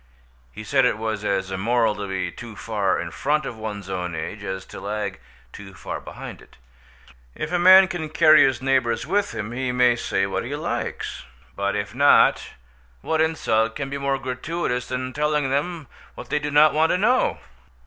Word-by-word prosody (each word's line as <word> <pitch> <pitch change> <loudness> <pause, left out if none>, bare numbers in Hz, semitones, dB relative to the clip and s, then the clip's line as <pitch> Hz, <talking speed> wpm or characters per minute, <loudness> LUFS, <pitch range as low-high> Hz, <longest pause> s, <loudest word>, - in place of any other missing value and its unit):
He 110 - -9
said 135 +5 +2
it 125 -3 +2
was 110 -1 -3
as 95 -2 -1
immoral 110 +3 +1
to 105 -1 -6
be 95 -1 -3
too 115 -3 -10
far 100 -3 -1
in 85 - -5
front 145 - 0
of 120 - -5
one's 105 -3 -6
own 90 -3 -4
age, 100 +6 -6
as 95 -1 -5
to - - -10
lag 100 -1 -4 0.3
too 95 -2 -11
far - - -6
behind - - -9
it. - - -19 0.8
If - - -5
a 180 - +1
man 185 +2 +8
can 175 -4 -5
carry 155 -1 +6
his 130 -1 +1
neighbours 125 -4 +1
with 200 +6 -1
him, 105 +1 -4
he 125 +1 -2
may 125 -1 +3
say 95 -4 -1
what 100 - -3
he - - -4
likes; - - -4 0.3
but 100 0 -1
if 105 +1 -3
not, 140 +3 +4 0.5
what 160 -1 0
insult 135 -8 +1
can 140 -1 -5
be 140 - -3
more 140 0 0
gratuitous 130 0 -3
than 130 0 -3
the - - -17
telling 150 -2 0
them 155 +3 -2 0.3
what 120 - -10
they 150 - +2
do 150 0 -3
not 150 +1 +5
want 160 +1 +3
to - - +2
know? 245 +7 +2
125 Hz, 195 wpm, -23 LUFS, 105-150 Hz, 0.8 s, man